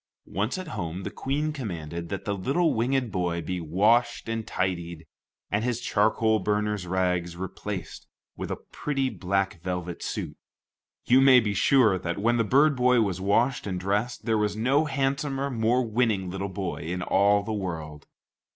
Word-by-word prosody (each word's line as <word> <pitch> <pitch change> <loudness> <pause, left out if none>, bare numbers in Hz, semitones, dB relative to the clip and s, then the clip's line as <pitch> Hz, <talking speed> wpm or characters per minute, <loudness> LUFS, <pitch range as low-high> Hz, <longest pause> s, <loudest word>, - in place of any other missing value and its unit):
Once 105 - -2
at 185 -3 -6
home, 90 - -4
the - - -4
Queen 150 +3 -2
commanded 85 - -5
that 100 - -5
the 100 - 0
little 140 - +1
winged 125 +1 0
boy 90 -2 -1
be 90 +1 -3
washed 110 +11 +2
and 115 -1 -3
tidied, 85 -4 -3 0.5
and 100 +2 +1
his 120 -1 -1
charcoal 110 -1 +2
burner's 105 -1 -1
rags 90 -1 0
replaced 95 0 -6 0.3
with - - -5
a - - -1
pretty 135 -3 -3
black 95 -2 -1
velvet 90 -1 -4
suit. - - -4 0.7
You 130 +2 +5
may 135 -2 +8
be 105 -3 -1
sure 110 -2 +4
that, 85 -1 -3
when 120 +4 +2
the 115 - +3
bird 140 +7 +4
boy 125 -1 +4
was 95 -4 -1
washed 115 +6 +1
and 90 -2 -2
dressed, 105 +6 -1
there 110 -2 +2
was 105 -1 0
no 135 +8 +2
handsomer, 140 0 -1
more 120 +1 +1
winning 110 -5 0
little 95 +1 -3
boy 95 -2 -4
in 90 +3 -4
all 100 +2 +3
the 110 +1 -3
world. 80 -7 -5
105 Hz, 170 wpm, -26 LUFS, 90-125 Hz, 0.7 s, may